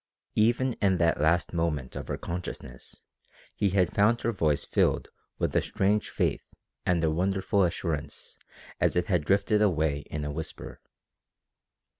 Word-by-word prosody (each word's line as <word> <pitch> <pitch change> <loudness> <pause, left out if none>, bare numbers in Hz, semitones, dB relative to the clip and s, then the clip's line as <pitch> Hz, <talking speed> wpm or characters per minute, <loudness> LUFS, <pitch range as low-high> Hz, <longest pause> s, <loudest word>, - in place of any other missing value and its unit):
Even 120 +4 +2
in 95 -3 +3
that 85 -3 +2
last 85 +3 +2
moment 80 -6 -2
of - - -6
her - - -3
consciousness 75 -8 -7 0.5
he 100 - +1
had 90 -2 +1
found 110 +4 +3
her 115 - 0
voice 80 -8 +2
filled - - +1 0.3
with - - -1
a - - +4
strange 105 +2 0
faith - - 0 0.5
and 85 -2 +2
a 80 - +2
wonderful 95 +4 +1
assurance 80 -4 -2 0.4
as - - +2
it 90 - +2
had 90 -5 +1
drifted 100 +5 +2
away 80 -8 +2
in 75 -1 -4
a 75 - -3
whisper. 80 +1 -7
90 Hz, 150 wpm, -28 LUFS, 80-100 Hz, 0.5 s, a